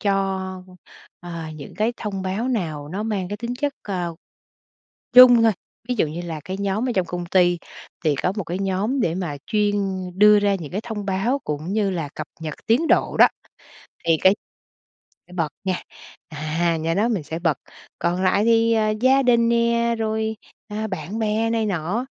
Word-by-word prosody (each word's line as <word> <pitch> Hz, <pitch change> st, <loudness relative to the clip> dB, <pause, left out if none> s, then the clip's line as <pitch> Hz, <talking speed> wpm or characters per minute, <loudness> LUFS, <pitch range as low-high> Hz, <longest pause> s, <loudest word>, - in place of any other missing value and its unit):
cho, 190 Hz, -2 st, -1 dB, 0.6 s
ờ, 170 Hz, -2 st, -6 dB
những 145 Hz, -2 st, -10 dB
cái 215 Hz, +5 st, 0 dB
thông 195 Hz, -3 st, -4 dB
báo 200 Hz, +7 st, -2 dB
nào 160 Hz, -, -2 dB
nó 190 Hz, +6 st, -3 dB
mang 205 Hz, -5 st, -2 dB
cái 205 Hz, -, -4 dB
tính 235 Hz, +2 st, -4 dB
chất, 285 Hz, +3 st, -1 dB
à, 180 Hz, -4 st, -2 dB, 1.0 s
chung 245 Hz, -2 st, +9 dB
thôi, 225 Hz, -1 st, +5 dB, 0.4 s
ví 250 Hz, -, +1 dB
dụ -, -, +3 dB
như 160 Hz, +3 st, -5 dB
là 165 Hz, -3 st, -5 dB
cái 190 Hz, +1 st, -4 dB
nhóm 200 Hz, +5 st, -1 dB
ở -, -, 0 dB
trong 185 Hz, -2 st, +1 dB
công 175 Hz, +1 st, -4 dB
ty 175 Hz, -1 st, +3 dB, 0.5 s
thì 155 Hz, -2 st, +3 dB
có 180 Hz, -, +1 dB
một 200 Hz, -, -2 dB
cái 175 Hz, +3 st, -4 dB
nhóm 195 Hz, +7 st, 0 dB
để 170 Hz, -7 st, +1 dB
mà 175 Hz, -6 st, -3 dB
chuyên 210 Hz, -2 st, +1 dB, 0.4 s
đưa 210 Hz, 0 st, +7 dB
ra 205 Hz, -1 st, +2 dB
những 165 Hz, -6 st, -6 dB
cái 200 Hz, -, -1 dB
thông 220 Hz, -3 st, -5 dB
báo 200 Hz, +8 st, 0 dB
cũng 155 Hz, +5 st, -3 dB
như 205 Hz, -2 st, +1 dB
là 165 Hz, -6 st, -3 dB
cập 155 Hz, -, -5 dB
nhật 155 Hz, -2 st, -4 dB
tiến 255 Hz, +9 st, +3 dB
độ -, -, +2 dB
đó -, -, +8 dB, 0.8 s
thì 165 Hz, -1 st, +4 dB
cái 190 Hz, +1 st, +6 dB, 0.9 s
phải 180 Hz, -, -15 dB
bật 165 Hz, -4 st, 0 dB, 0.2 s
nha, 185 Hz, -1 st, -1 dB, 0.5 s
à, 160 Hz, +2 st, -1 dB
nhóm 165 Hz, +3 st, 0 dB
đó 225 Hz, +4 st, +2 dB
mình 195 Hz, -9 st, -1 dB
sẽ 160 Hz, +3 st, -5 dB
bật. 165 Hz, -5 st, +1 dB, 0.4 s
Còn 175 Hz, +2 st, 0 dB
lại 200 Hz, +3 st, +3 dB
thì, 230 Hz, 0 st, +4 dB
ờ, 215 Hz, -1 st, +2 dB
gia 265 Hz, +1 st, +5 dB
đình 235 Hz, -2 st, +4 dB
nè, 235 Hz, 0 st, +2 dB
rồi, 220 Hz, 0 st, -1 dB, 0.3 s
ờ, 215 Hz, +1 st, -3 dB
bạn 190 Hz, +3 st, -5 dB
bè 220 Hz, +1 st, +1 dB
này 225 Hz, -1 st, 0 dB
nọ 195 Hz, +5 st, -1 dB
195 Hz, 190 wpm, -22 LUFS, 175-225 Hz, 1.0 s, chung